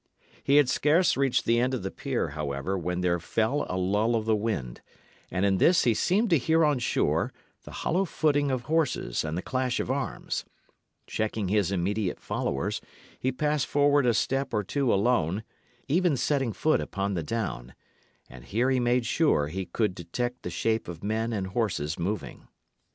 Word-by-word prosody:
He 140 - +3
had 145 -2 +6
scarce 155 +8 +3
reached 135 -2 +1
the 115 0 +3
end 130 +2 +1
of 120 - -5
the 95 - -3
pier, - - -2
however, 75 +4 -3
when 90 0 -2
there 90 -1 +1
fell 115 - 0
a 90 - -2
lull 105 +5 +1
of 110 -1 -1
the 110 -1 +3
wind; 100 - -3 0.5
and 95 +2 0
in 95 -2 +2
this 175 0 +5
he 120 - +3
seemed 200 - +1
to 165 - +5
hear 160 +4 +3
on 145 -4 +2
shore 120 - +1 0.3
the - - -9
hollow 185 +4 0
footing 145 -4 +1
of 130 -2 -1
horses 155 - 0
and 80 +1 -3
the 90 - -3
clash 130 -1 -1
of - - -1
arms. 135 0 -3 0.6
Checking 110 -2 -2
his 100 -2 +2
immediate 100 +1 -1
followers, - - -2 0.4
he 130 - 0
passed 150 +1 0
forward 145 -2 +3
a 120 - +3
step 135 0 0
or 105 - +1
two 135 +5 0
alone, 100 -3 +1 0.4
even 170 0 +2
setting 135 -3 0
foot 155 +7 +1
upon 100 0 -2
the 85 - -1
down; 75 - -4 0.5
and 60 0 -13
here 120 - +1
he 130 - +2
made 120 0 +2
sure 115 - +2
he 95 +2 -4
could 105 +2 0
detect 120 +9 -4
the - - -5
shape 110 +7 -1
of 85 -2 -8
men 110 +2 -1
and 100 -4 -2
horses 95 -7 -2
moving. 100 +3 -4
115 Hz, 185 wpm, -27 LUFS, 95-135 Hz, 0.6 s, had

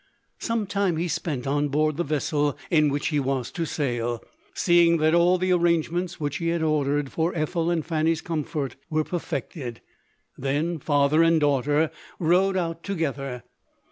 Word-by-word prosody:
Some 230 -2 -1
time 200 -4 0
he 170 +2 -1
spent 145 -6 -3
on 145 +2 +1
board 155 +1 +1
the 175 - +1
vessel 145 -1 0
in 155 -3 +4
which 145 +1 -1
he 150 -2 +1
was 135 -2 -2
to 170 - -2
sail; 120 -6 -2 0.3
seeing 170 -1 +4
that 155 0 +2
all 175 +2 +4
the 185 0 +1
arrangements 175 0 +1
which 145 -2 -2
he 165 - -3
had 165 -1 0
ordered 145 -2 0
for 165 +2 -1
Ethel 165 +1 -1
and 170 -3 0
Fanny's 160 0 +1
comfort 150 -5 -3
were 155 -1 +1
perfected; 145 -7 -5 0.6
then 150 +5 -1
father 145 +2 +3
and 165 -1 +4
daughter 145 +2 +2 0.3
rode 185 +3 +3
out 165 -2 -2
together. 140 - -3
155 Hz, 160 wpm, -25 LUFS, 145-170 Hz, 0.6 s, in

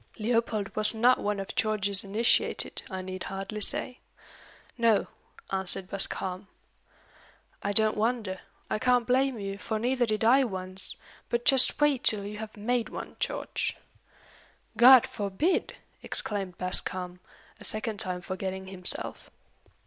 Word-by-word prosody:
Leopold 225 -2 -2
was 215 +1 +4
not 245 +3 +3
one 205 -1 -2
of 195 - -6
George's 205 -2 +1
initiated, 210 +4 0
I 190 -1 -6
need 185 0 -7
hardly 195 +2 -6
say. 250 +4 +1 0.8
"No," 230 -4 +2 0.5
answered 190 0 -2
Bascombe. 190 -1 -2 1.1
"I 200 - -2
don't 215 +1 +5
wonder. 215 -4 -2 0.3
I - - -2
can't 250 0 +2
blame 260 +1 +1
you, 195 -1 -6
for 220 - -3
neither 245 +2 0
did 215 0 -2
I 260 +5 +5
once. 185 -4 +1 0.3
But 235 0 -2
just 265 +1 +6
wait 295 -4 +2
till 205 -2 +1
you 210 +1 -7
have 220 0 -9
made 235 +2 -1
one, - - -8
George!" - - -3 1.0
"God 255 0 +8
forbid!" 210 - -2 0.3
exclaimed 195 -4 -4
Bascombe, 180 0 +3 0.4
a - - -12
second 215 -1 -1
time 180 -1 0
forgetting 190 +1 -5
himself. 185 -2 -4
210 Hz, 135 wpm, -27 LUFS, 190-235 Hz, 1.1 s, God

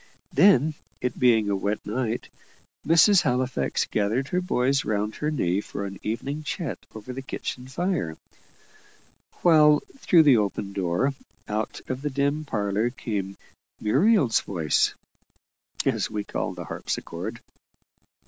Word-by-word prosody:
Then, 155 -2 +5 0.3
it 125 -1 -3
being 115 -4 +4
a 100 - +1
wet 100 +2 -2
night, 115 +1 -2 0.6
Mrs. 170 +4 +6
Halifax 130 -2 0
gathered 110 +6 -1
her 180 - 0
boys 140 -5 +1
round 105 0 -2
her 150 - -1
knee 100 - 0
for 100 - -6
an 100 -1 -7
evening 135 +7 -3
chat 155 -1 -4 0.2
over 110 +4 -7
the 135 - -5
kitchen 125 -1 -6
fire; 140 - -2 1.3
while 150 -3 +6 0.2
through 170 -9 +5
the 140 -5 +6
open 100 -1 -2
door, 95 +9 0 0.3
out 105 +1 -3
of 130 0 -4
the 150 - -1
dim 140 +2 0
parlour 105 -2 0
came 100 -6 -4 0.4
"Muriel's 140 - +3
voice," 80 -6 +1 0.9
as - - +1
we 105 -1 -3
called - - -3
the - - -7
harpsichord. - - -5
125 Hz, 130 wpm, -25 LUFS, 105-150 Hz, 1.3 s, Mrs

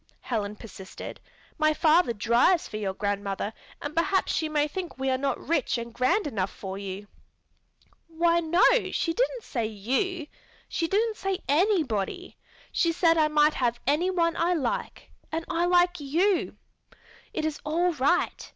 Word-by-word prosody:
Helen 210 -4 -3
persisted. 195 -3 -9 0.4
"My 310 0 +3
father 320 -3 +4
drives 235 - +3
for 215 - -6
your 195 -3 -3
grandmother 200 +1 -2 0.3
and 290 +1 -5
perhaps 380 +3 +1
she 315 - 0
may 300 -1 +1
think 355 +1 -6
we 265 0 0
are 260 - +1
not 275 0 0
rich 300 -5 0
and 235 0 -6
grand 345 - +1
enough 195 -9 -1
for 190 -1 -7
you." 200 +1 -6 1.0
"Why, 335 +1 +2
no, 340 +2 +2 0.3
she 330 - 0
didn't - - -1
say 235 -5 -2
you. 265 - -2 0.4
She 330 - -1
didn't 435 +4 +1
say 385 0 -3
_any_body. 315 - +1 0.4
She 335 - +2
said 330 0 +3
I 310 - +4
might 300 0 +4
have 240 -2 0
anyone 335 +3 +1
I 345 +2 +1
like, 265 -8 -3 0.2
and 325 +1 -3
I 345 0 0
like 355 0 +3
you. 340 +7 +1 0.7
It 315 - -2
is 310 -1 -2
all 340 +4 +1
right. 295 +5 0
310 Hz, 155 wpm, -27 LUFS, 235-350 Hz, 1.0 s, father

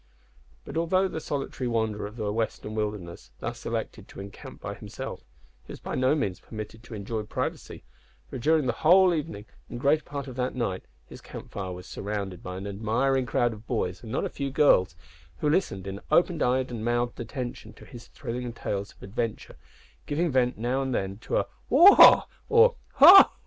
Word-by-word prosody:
But, - - -6
although 185 +3 +2
the 170 - -5
solitary 135 -4 -4
wanderer 110 -3 -1
of 105 - -12
the 105 -3 -3
western 110 -1 -3
wilderness 105 -5 -5
thus - - -6
elected - - -4
to - - -12
encamp 100 +1 -10
by - - -6
himself, - - -7 0.4
he - - -10
was - - -10
by - - -6
no 130 +3 +2
means 100 -12 -2
permitted 110 0 -9
to 120 -1 -10
enjoy 110 +2 -4
privacy, 105 - -5 0.4
for 130 - -7
during 155 +3 +2
the 125 - 0
whole 180 +3 +6
evening 150 -10 -4 0.2
and 120 - -6
greater 145 +4 +3
part 140 -2 -6
of 130 -3 -9
that 125 0 -2
night 95 -7 -3 0.2
his - - -12
campfire 95 -2 -7
was 90 0 -8
surrounded 100 -3 -5
by 90 0 -6
an 95 - -6
admiring 115 +6 0
crowd 120 -1 +1
of 110 +1 -13
boys, 90 -6 -2
and 110 - -9
not 130 - -1
a - - -2
few 140 -1 -4
girls, 110 - +3 0.4
who - - 0
listened 100 - -1
in 95 0 -6
open 175 -2 +2
eyed 130 +1 +1
and 115 -2 -5
mouthed 120 +1 -1
attention 120 +1 -6
to - - -15
his 120 -3 -12
thrilling 120 +1 -5
tales 100 -3 -4
of - - -19
adventure, 110 +2 -4 0.5
giving 165 +3 0
vent 125 -1 +1
now 125 +4 -1
and 130 -2 -2
then 95 +1 -3
to - - -2
a - - +1 0.2
"waugh!" 345 +10 +8 0.2
or 465 +2 +6 0.3
a - - +11 0.2
"ho!" - - -11
120 Hz, 190 wpm, -27 LUFS, 105-140 Hz, 0.5 s, a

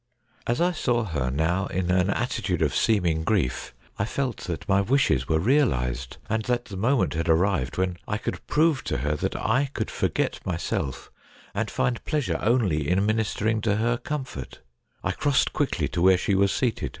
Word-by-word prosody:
As 120 +5 0
I 175 +1 +3
saw 120 -8 0
her 70 -10 -2
now 80 +8 0
in 90 -1 -1
an 90 +1 +2
attitude 95 -6 -1
of 75 - 0
seeming 85 -7 +2
grief, 80 - -1 0.2
I - - +1
felt 130 +1 -2
that 85 -2 -5
my 100 0 +4
wishes 100 - +2
were 80 - +2
realised, 65 - +1
and 110 +1 0
that 120 -1 0
the 100 - -8
moment 115 +7 +1
had 85 +1 -2
ar 80 - +6
rived 85 -6 0
when 90 -1 0
I 105 - -1
could - - -5
prove 155 -2 +2
to - - -1
her 75 +1 +1
that - - -2
I 130 +5 +1
could - - -2
forget - - -1
myself 85 -6 -3 0.4
and - - -1
find 65 -1 -1
pleasure 150 -5 -1
only 100 - +1
in 95 +3 +2
ministering 110 0 0
to 105 -1 +1
her 115 +3 +1
comfort. 130 - -6 0.4
I - - 0
crossed 145 -2 +1
quickly - - 0
to - - -2
where 95 +1 +6
she 100 - 0
was 100 0 +3
seated. 125 -4 -1
100 Hz, 185 wpm, -25 LUFS, 80-120 Hz, 0.4 s, ar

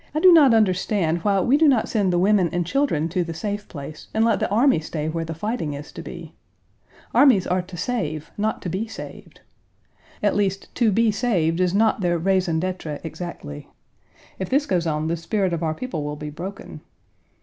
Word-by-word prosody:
I - - +2
do 365 +2 +7
not 295 -6 +7
understand 190 -5 +2
why 195 +2 +1
we 265 +8 +3
do 315 0 +4
not 255 -6 +3
send 200 -5 +1
the 175 - +1
women 190 -1 +3
and 175 -1 -1
children 180 - 0
to 180 +1 0
the 165 -1 -6
safe 205 +3 -4
place 150 0 -9
and 220 +1 +3
let 230 - +2
the - - -1
army 235 - +3
stay 155 -1 -4
where 165 +1 -2
the 165 0 -5
fighting 165 -5 -3
is 145 +1 -9
to - - -8
be. - - -9 0.8
Armies 250 -10 +5
are 180 +1 0
to 180 0 -11
save, 160 -8 -3
not 215 +1 -2
to 180 - -3
be 195 +6 -2
saved. 225 - -10 0.8
At 205 - +2
least, 195 -1 -1
to 235 -3 +2
be 225 +2 +3
saved 185 -7 0
is 180 0 +1
not 220 0 +2
their 175 -2 +1
raison 180 -1 +1
d'être 175 -4 -4
exactly. 160 - -7 0.7
If 190 - -3
this 280 +2 +2
goes 175 - 0
on 155 0 -1
the 165 - 0
spirit 185 +2 -1
of 170 - -2
our 160 -1 -1
people 205 -8 -4
will 150 0 -4
be 150 0 -7
broken. 185 +6 -8
185 Hz, 205 wpm, -23 LUFS, 165-215 Hz, 0.8 s, do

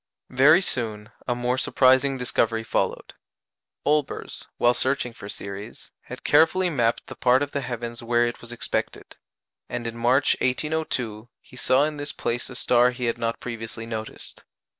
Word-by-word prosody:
Very 145 +7 +6
soon, 110 - -2 0.2
a 120 - +1
more 125 +1 0
surprising 130 +1 +3
discovery 115 -2 0
followed. - - -2 0.7
Olbers, 150 -1 -1
while 120 0 +4
searching 130 -2 0
for 100 - -10
Ceres, 100 +3 -8
had - - -9
carefully 165 +4 +4
mapped 120 -6 0
the - - -9
part 130 +2 +3
of 145 - -5
the 140 - -2
heavens 120 -2 -5
where 120 0 +2
it 120 - -4
was 120 - -10
expected; 120 - -4 0.5
and 120 -1 -4
in 115 0 -4
March, 125 +4 +3
1802, 125 -5 -1
he - - -18
saw 130 +2 +3
in 150 0 -2
this 145 -1 -4
place 120 -1 -2
a 130 - -9
star 125 0 +4
he 125 0 -4
had 115 - -1
not 115 0 -2
previously 115 -1 -6
noticed. 110 -1 -7
125 Hz, 160 wpm, -25 LUFS, 115-135 Hz, 0.7 s, Very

